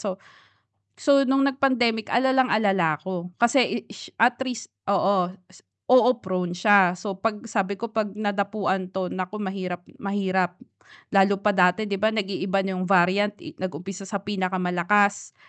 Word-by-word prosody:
so 195 -4 -4 0.8
so 275 -2 +3
nung 270 +1 +3
nag-pandemic 260 -5 +1
alalang-alala 215 -10 +2
ako 180 +2 -7
kasi 235 +6 +3
i 240 - +2
ish 220 - -10
at 240 +2 +3
risk 245 - -6 0.2
oo, 195 -2 +2 0.2
s - - -18 0.3
oo 255 0 +7
prone 180 -2 -2
siya. 185 -1 +4
So, 190 +1 -6
'pag 215 +1 -2
sabi 200 -1 -1
ko 230 +3 -6
'pag 215 -2 -2
nadapuan 200 -2 -1
'to 185 -1 -4
naku 185 +2 -4
mahirap 185 -2 -5 0.2
mahirap 190 -3 -1 0.6
lalo 195 0 +4
pa 210 - +4
dati 180 +2 +3
'di 200 -2 -3
ba 220 +2 +1
nag-iiba 195 -1 -1
na 190 -1 -3
yung 185 - -2
variant 195 +2 +3
i - - -8
nag-umpisa 185 +2 -6
sa 200 +1 -2
pinakamalakas, 190 +1 0
200 Hz, 150 wpm, -24 LUFS, 185-220 Hz, 0.8 s, oo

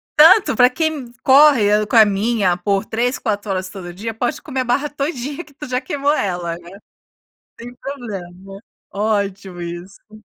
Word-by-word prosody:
Tanto 320 0 +6
para 250 -1 +6
quem 290 -3 -3
corre, 255 -7 +5
caminha 210 -3 +3
por 195 +2 -1
3, 245 +4 -1
4 205 -3 -2
horas 185 -1 -3
todo 180 -3 -9
dia, 220 +5 -5
pode 240 +3 -3
comer 265 -4 -3
a - - 0
barra 280 +5 0
todinha 285 +1 -4
que 300 - -21
tu 295 +1 -9
já 255 0 -1
queimou 285 +1 0
ela, 175 - -2
né. 175 +3 -13 0.8
Sem 245 +1 -9
problema, 195 -8 -8 0.3
ótimo 200 -3 -2
isso. 190 +5 -10
220 Hz, 150 wpm, -19 LUFS, 195-270 Hz, 0.8 s, Tanto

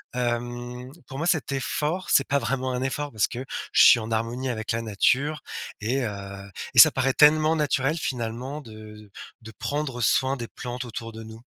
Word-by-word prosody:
hem, 120 +1 -3 0.2
pour 135 - -8
moi, 165 - -1
cet 160 -4 +1
effort, 150 +6 -2
c'est 140 - +4
pas 140 - +2
vraiment 130 +2 -2
un 125 - -2
effort 145 +2 -3
parce 105 -3 +2
que 130 +1 -6 0.3
je - - +5
suis 120 - +8
en 110 +1 -6
harmonie 115 +4 -2
avec 110 -2 -3
la 115 - -1
nature 130 +8 +1 0.4
et 125 +6 0
heu, 100 -2 -7 0.2
et - - +7
ça - - +10
paraît 130 0 +1
tellement 155 +1 +5
naturel 150 0 0
finalement 125 +1 -4
de 110 -3 -12 0.3
de 110 - -10
prendre 145 -4 -3
soin 130 +4 +2
des 120 -2 -5
plantes 125 0 -6
autour 115 -1 -7
de 110 - -8
nous. 110 0 -11
125 Hz, 185 wpm, -25 LUFS, 115-135 Hz, 0.4 s, ça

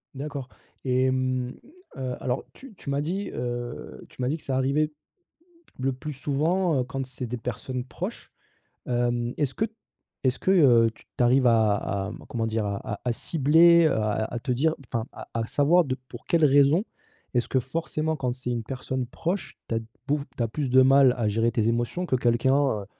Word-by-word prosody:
D'accord 140 -2 -5 0.4
et 130 0 +2
mmh, 130 -1 -1 0.5
heu, 130 -1 -3
alors 125 0 -1
tu 265 -4 -13
tu 140 - -9
m'as 140 +1 0
dit, 190 +6 -2
heu, 120 0 -5
tu - - -10
m'as 125 - +1
dit 155 - 0
que - - -13
«Ça 130 - -2
arrivait, 140 +4 +1 0.9
le 135 +1 +1
plus 150 +4 -6
souvent, 155 +4 +1
heu, - - 0
quand 135 0 -4
c'est 130 -1 -6
des 125 +2 -4
personnes 125 +2 -4
proches». 125 - -6 0.6
Hem, 120 0 0
est-ce 140 -3 0
que 220 - +1 0.6
est-ce 125 -1 +2
que, 190 - +1
heu, 120 -10 +6
t - - -21
tu 125 - +3
arrives 125 +1 +4
à 110 -3 +4
à, 100 0 -3
mmh, - - -10
comment 115 -2 -2
dire? 110 -1 -1
A 100 -1 -1
à 105 - -5
à - - +3
cibler, 165 +5 +5
heu, 155 - +3
à 110 0 0
à 120 - -4
te 125 +1 -3
dire 155 +6 +2
enfin 115 -2 -2
à - - -9
à 115 -1 -1
savoir 160 +4 +4
de 130 -1 -1
pour 120 - -10
quelle 165 -2 +2
raison? 145 +6 +5 0.5
Est-ce 120 -1 +1
que 130 - +2
forcément 160 +3 -2
quand 125 -2 -1
c'est 130 -1 -5
une 120 -2 -1
personne 130 0 -3
proche, 175 +9 -3
tu 115 - 0
as - - +1 0.3
beau 145 +1 +2 0.2
tu 120 - +1
as - - +1
plus 140 +1 -2
de 130 +1 +6
mal 135 -1 +6
à 110 -3 0
gérer 115 +2 +1
tes 110 -1 +1
émotions, 120 +10 -1
que 130 - +1
quelqu'un, 120 +2 +2 0.3
heu, - - -9
130 Hz, 205 wpm, -26 LUFS, 120-145 Hz, 0.9 s, heu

